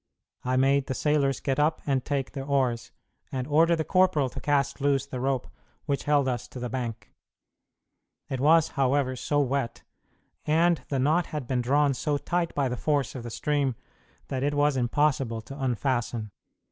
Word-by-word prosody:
I 130 Hz, +1 st, 0 dB
made 135 Hz, +1 st, +3 dB
the 130 Hz, -, -2 dB
sailors 140 Hz, -3 st, +1 dB
get 135 Hz, 0 st, -1 dB
up 150 Hz, +2 st, +2 dB
and 135 Hz, -3 st, +1 dB
take 140 Hz, -2 st, -2 dB
their 135 Hz, -, -5 dB
oars, 125 Hz, -4 st, 0 dB, 0.4 s
and 130 Hz, -1 st, -2 dB
ordered 165 Hz, +4 st, +4 dB
the 160 Hz, -, -1 dB
corporal 185 Hz, -7 st, +2 dB
to -, -, -8 dB
cast 145 Hz, -1 st, 0 dB
loose 140 Hz, -1 st, +2 dB
the 130 Hz, -2 st, -6 dB
rope 130 Hz, -1 st, 0 dB, 0.4 s
which 140 Hz, -2 st, -2 dB
held 145 Hz, -2 st, +3 dB
us 125 Hz, -1 st, -2 dB
to 125 Hz, -, -9 dB
the 125 Hz, -1 st, -4 dB
bank. 120 Hz, -3 st, -5 dB, 1.1 s
It 130 Hz, -, -3 dB
was, 155 Hz, +3 st, +5 dB
however, 135 Hz, -1 st, +1 dB
so 145 Hz, +3 st, 0 dB
wet, 135 Hz, -3 st, -2 dB, 0.6 s
and 165 Hz, +2 st, +3 dB
the 140 Hz, -, 0 dB
knot 155 Hz, +7 st, +2 dB
had 150 Hz, -5 st, -5 dB
been 125 Hz, 0 st, 0 dB
drawn 140 Hz, +3 st, +2 dB
so 145 Hz, +3 st, -1 dB
tight 175 Hz, +3 st, -2 dB
by 140 Hz, -2 st, +1 dB
the 125 Hz, 0 st, -3 dB
force 145 Hz, -1 st, 0 dB
of 130 Hz, -, -6 dB
the 120 Hz, -, -7 dB
stream, 140 Hz, +1 st, 0 dB, 0.5 s
that 130 Hz, -1 st, -2 dB
it 145 Hz, +1 st, 0 dB
was 145 Hz, -1 st, +3 dB
impossible 130 Hz, -2 st, +1 dB
to 135 Hz, +5 st, -8 dB
unfasten. 120 Hz, -3 st, -1 dB
135 Hz, 180 wpm, -27 LUFS, 130-145 Hz, 1.1 s, was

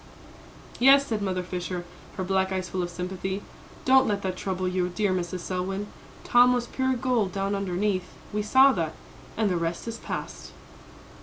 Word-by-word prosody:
"Yes," 275 Hz, +3 st, +7 dB
said 220 Hz, -5 st, -2 dB
Mother 185 Hz, -2 st, -1 dB
Fisher, 180 Hz, 0 st, -4 dB, 0.3 s
her 190 Hz, -, -1 dB
black 190 Hz, 0 st, +1 dB
eyes 185 Hz, -1 st, -2 dB
full 185 Hz, 0 st, -2 dB
of 175 Hz, -, -2 dB
sympathy; 190 Hz, +2 st, -4 dB, 0.4 s
"don't 265 Hz, 0 st, +6 dB
let 200 Hz, -1 st, -1 dB
that 185 Hz, -1 st, -2 dB
trouble 185 Hz, 0 st, -2 dB
you, 180 Hz, 0 st, 0 dB
dear 200 Hz, +2 st, 0 dB
Mrs. 180 Hz, 0 st, -3 dB
Selwyn; 190 Hz, +3 st, -3 dB, 0.4 s
Tom 245 Hz, +1 st, +6 dB
was 245 Hz, -1 st, 0 dB
pure 260 Hz, +1 st, 0 dB
gold 245 Hz, -6 st, 0 dB
down 195 Hz, +1 st, -1 dB
underneath 190 Hz, -1 st, -1 dB, 0.2 s
we 210 Hz, -, 0 dB
saw 265 Hz, +6 st, +6 dB
that 165 Hz, -7 st, -2 dB, 0.4 s
and 220 Hz, -1 st, +2 dB
the 180 Hz, -3 st, +1 dB
rest 170 Hz, +5 st, -3 dB
is 230 Hz, 0 st, -4 dB
past." -, -, -6 dB
190 Hz, 170 wpm, -26 LUFS, 180-220 Hz, 0.4 s, Yes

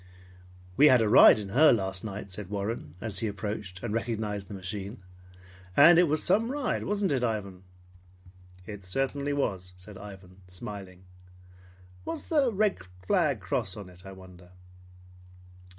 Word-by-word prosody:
"We 150 Hz, -, +7 dB
had 125 Hz, -5 st, +5 dB
a -, -, +1 dB
ride 105 Hz, -, +8 dB
in 105 Hz, -2 st, -6 dB
her 150 Hz, +9 st, +6 dB
last 95 Hz, -4 st, -1 dB
night," 100 Hz, -2 st, -7 dB
said 95 Hz, 0 st, -5 dB
Warren, 100 Hz, -6 st, -4 dB
as 105 Hz, -4 st, -3 dB
he 115 Hz, -, -1 dB
approached 100 Hz, -2 st, -6 dB
and 105 Hz, -, -3 dB
recognized 110 Hz, -3 st, -3 dB
the 105 Hz, -, -8 dB
machine. 100 Hz, +2 st, -7 dB, 0.7 s
"And 170 Hz, +1 st, +8 dB
it 175 Hz, -, +5 dB
was 155 Hz, +1 st, +1 dB
some 225 Hz, +6 st, +2 dB
ride, 280 Hz, -4 st, -2 dB
wasn't 205 Hz, -3 st, 0 dB
it, 130 Hz, -3 st, 0 dB
Ivan?" 100 Hz, -5 st, -3 dB, 1.0 s
"It 105 Hz, -3 st, -9 dB
certainly 135 Hz, +9 st, -2 dB
was," 95 Hz, -10 st, -2 dB
said 95 Hz, +2 st, -12 dB
Ivan, 95 Hz, -2 st, -12 dB
smiling. 95 Hz, -1 st, -9 dB, 1.0 s
"What's 165 Hz, -, -5 dB
the 285 Hz, -6 st, +1 dB
red 210 Hz, -, +1 dB
cross 90 Hz, +1 st, -2 dB
flag -, -, -12 dB
on 100 Hz, -3 st, -9 dB
it 90 Hz, 0 st, -15 dB
I 95 Hz, -, -10 dB
wonder?" 90 Hz, -1 st, -15 dB
105 Hz, 150 wpm, -28 LUFS, 95-130 Hz, 1.0 s, ride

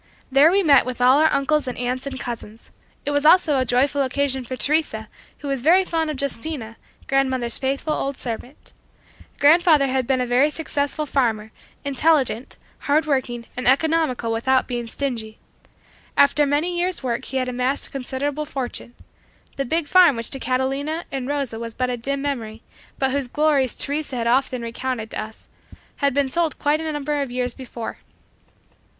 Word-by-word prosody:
There 275 Hz, +4 st, +6 dB
we 395 Hz, +1 st, +3 dB
met 285 Hz, -5 st, +6 dB
with 255 Hz, -1 st, -5 dB
all 255 Hz, +3 st, +5 dB
our 315 Hz, 0 st, +4 dB
uncles 290 Hz, +1 st, +1 dB
and 250 Hz, -, -4 dB
aunts 250 Hz, +2 st, -2 dB
and 270 Hz, -1 st, -5 dB
cousins. 225 Hz, -3 st, -8 dB, 0.3 s
It 290 Hz, -, -1 dB
was 285 Hz, 0 st, +1 dB
also 310 Hz, -3 st, +5 dB
a 255 Hz, -, +1 dB
joyful 270 Hz, +4 st, +2 dB
occasion 270 Hz, 0 st, 0 dB
for 255 Hz, +2 st, -5 dB
Teresa 265 Hz, -5 st, 0 dB, 0.3 s
who 290 Hz, -, -8 dB
was 275 Hz, -2 st, -1 dB
very 355 Hz, +7 st, +5 dB
fond 325 Hz, -3 st, -1 dB
of 295 Hz, -3 st, -4 dB
Justina, 265 Hz, -3 st, -3 dB, 0.3 s
grandmother's 260 Hz, -3 st, +1 dB
faithful 275 Hz, +3 st, -1 dB
old 275 Hz, -2 st, -3 dB
servant 245 Hz, +3 st, -7 dB, 0.7 s
Grandfather 315 Hz, -1 st, +5 dB
had 260 Hz, -2 st, -1 dB
been 265 Hz, -1 st, +2 dB
a 250 Hz, -, 0 dB
very 250 Hz, +4 st, +3 dB
successful 300 Hz, -1 st, -2 dB
farmer, 225 Hz, -6 st, 0 dB, 0.3 s
intelligent, 275 Hz, -4 st, +1 dB, 0.2 s
hard 300 Hz, +3 st, +1 dB
working 250 Hz, -5 st, -1 dB
and 250 Hz, -, -3 dB
economical 275 Hz, -4 st, +2 dB
without 260 Hz, +3 st, +1 dB
being 240 Hz, -2 st, -3 dB
stingy. 225 Hz, -4 st, -4 dB, 0.8 s
After 285 Hz, +1 st, +4 dB
many 305 Hz, +5 st, 0 dB
years' 360 Hz, -3 st, -1 dB
work 240 Hz, -2 st, -2 dB
he 265 Hz, -, -4 dB
had 255 Hz, -1 st, 0 dB
amassed 250 Hz, +2 st, -1 dB
a -, -, -12 dB
considerable 275 Hz, +3 st, -3 dB
fortune. 250 Hz, -3 st, -5 dB, 0.6 s
The 275 Hz, -, -2 dB
big 325 Hz, +5 st, 0 dB
farm 360 Hz, -6 st, +6 dB
which 230 Hz, 0 st, -3 dB
to 270 Hz, -, -2 dB
Catalina 270 Hz, +6 st, -1 dB
and 265 Hz, -2 st, -3 dB
Rosa 275 Hz, -6 st, -2 dB
was 230 Hz, -1 st, -6 dB
but 255 Hz, 0 st, -1 dB
a -, -, -1 dB
dim 275 Hz, +4 st, -3 dB
memory, 230 Hz, -6 st, -4 dB, 0.3 s
but 265 Hz, -1 st, +1 dB
whose 275 Hz, -1 st, -1 dB
glories 285 Hz, -2 st, +2 dB
Teresa 290 Hz, -1 st, -3 dB
had 235 Hz, -1 st, -2 dB
often 255 Hz, 0 st, +1 dB
recounted 230 Hz, -1 st, -4 dB
to -, -, -3 dB
us, 215 Hz, +1 st, -10 dB, 0.5 s
had 280 Hz, -2 st, +1 dB
been 285 Hz, -1 st, +2 dB
sold 325 Hz, +2 st, 0 dB
quite 295 Hz, +2 st, +1 dB
a 320 Hz, -1 st, -3 dB
number 295 Hz, 0 st, -2 dB
of 275 Hz, -, -3 dB
years 250 Hz, 0 st, -2 dB
before. 245 Hz, -3 st, -7 dB
270 Hz, 175 wpm, -22 LUFS, 245-290 Hz, 0.8 s, There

